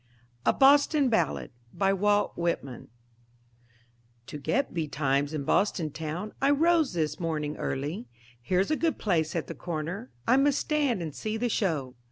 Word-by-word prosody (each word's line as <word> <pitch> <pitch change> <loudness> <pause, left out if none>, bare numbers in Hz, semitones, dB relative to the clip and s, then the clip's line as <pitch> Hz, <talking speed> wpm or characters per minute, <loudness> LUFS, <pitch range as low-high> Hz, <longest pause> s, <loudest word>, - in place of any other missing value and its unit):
A - - +7
BOSTON 285 0 +5
BALLAD 175 - 0 0.2
BY 195 -1 +2
WALT 205 +1 +1
WHITMAN 165 -7 -3 1.4
To 140 - -7
get 270 - 0
betimes 145 -3 0
in 150 -3 -3
Boston 165 -1 +1
town, 160 +7 -5
I 275 - +4
rose 320 - +3
this 155 -3 -1
morning 155 -3 -2
early; 150 - -3 0.3
Here's 185 - +1
a - - +3
good 325 0 0
place 165 -6 0
at 165 - -1
the - - -6
corner 175 +7 -5 0.2
I 255 - +5
must 280 0 +3
stand 285 - 0
and 155 -3 -5
see 215 +7 -3
the 240 +2 -1
show. 155 - -1
180 Hz, 155 wpm, -28 LUFS, 155-250 Hz, 1.4 s, A